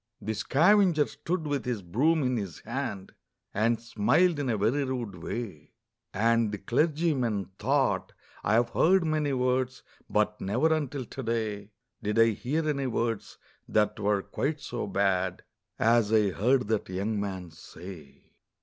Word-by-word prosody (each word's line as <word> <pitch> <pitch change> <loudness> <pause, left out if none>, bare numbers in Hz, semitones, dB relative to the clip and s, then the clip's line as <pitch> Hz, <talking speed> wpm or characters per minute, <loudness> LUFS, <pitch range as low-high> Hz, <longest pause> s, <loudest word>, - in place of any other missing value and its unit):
The 110 - -3
scavenger 170 - +4
stood 170 -1 -4
with 145 -3 -1
his 120 -6 -3
broom 145 - +2
in 125 -1 +1
his 100 -8 -5
hand, 115 -5 -4 0.4
And 110 +2 +2
smiled 130 - +2
in 140 -3 -1
a 110 - +1
very 115 +8 +1
rude 125 -6 -3
way; 100 -7 -6 0.4
And 115 +1 +2
the 105 - -3
clergyman 125 - 0
thought, 105 -7 +1 0.3
'I 100 - +1
have 120 +1 +3
heard 185 +7 +4
many 155 -2 0
words, 130 0 0 0.3
But 105 0 0
never, 125 +12 +2
until 145 -4 -2
to 135 - -7
day, 110 -4 -2 0.3
Did 105 0 -1
I 115 0 +6
hear 150 +9 -2
any 140 -3 0
words 115 -2 -2 0.3
that 105 0 +1
were 100 -1 +1
quite 150 +2 -2
so 120 - -4
bad 95 -2 0 0.3
As 115 -1 +3
I 105 -3 +4
heard 125 +6 +2
that 110 -4 0
young 100 +3 -2
man 95 -4 -4
say.' 80 -2 -12
115 Hz, 150 wpm, -28 LUFS, 100-140 Hz, 0.4 s, I